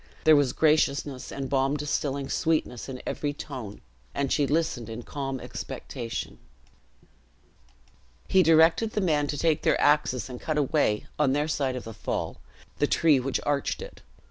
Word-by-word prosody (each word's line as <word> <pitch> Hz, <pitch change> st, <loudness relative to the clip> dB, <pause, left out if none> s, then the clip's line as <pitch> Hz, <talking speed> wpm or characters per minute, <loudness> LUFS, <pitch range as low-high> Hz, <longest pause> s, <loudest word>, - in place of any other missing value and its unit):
There 155 Hz, 0 st, +7 dB
was 145 Hz, -3 st, +3 dB
graciousness 145 Hz, -3 st, +1 dB
and 135 Hz, -1 st, -4 dB
balm 135 Hz, +2 st, +1 dB
distilling 140 Hz, -1 st, -2 dB
sweetness 155 Hz, -7 st, -1 dB
in 130 Hz, -1 st, -7 dB
every 145 Hz, -1 st, -2 dB
tone; 125 Hz, -8 st, -7 dB, 0.3 s
and 140 Hz, -1 st, -1 dB
she 145 Hz, -2 st, +2 dB
listened 145 Hz, -7 st, -1 dB
in 115 Hz, +2 st, -6 dB
calm 135 Hz, -1 st, -4 dB
expectation. 115 Hz, -1 st, -6 dB, 1.9 s
He 190 Hz, -, +5 dB
directed 165 Hz, +6 st, +4 dB
the -, -, 0 dB
men 150 Hz, -5 st, +2 dB
to 145 Hz, -, -3 dB
take 160 Hz, 0 st, +2 dB
their -, -, +2 dB
axes, 145 Hz, -6 st, +2 dB
and 125 Hz, -2 st, -8 dB
cut 155 Hz, -1 st, -2 dB
away, 140 Hz, -7 st, +1 dB
on 140 Hz, -3 st, +3 dB
their 145 Hz, +2 st, +1 dB
side 140 Hz, -4 st, -1 dB
of 125 Hz, -, -5 dB
the 115 Hz, -, -8 dB
fall, 110 Hz, -, -3 dB, 0.4 s
the 145 Hz, -, +3 dB
tree 155 Hz, -3 st, +4 dB
which 130 Hz, +1 st, -1 dB
arched 145 Hz, -1 st, 0 dB
it. -, -, -9 dB
140 Hz, 160 wpm, -27 LUFS, 130-150 Hz, 1.9 s, There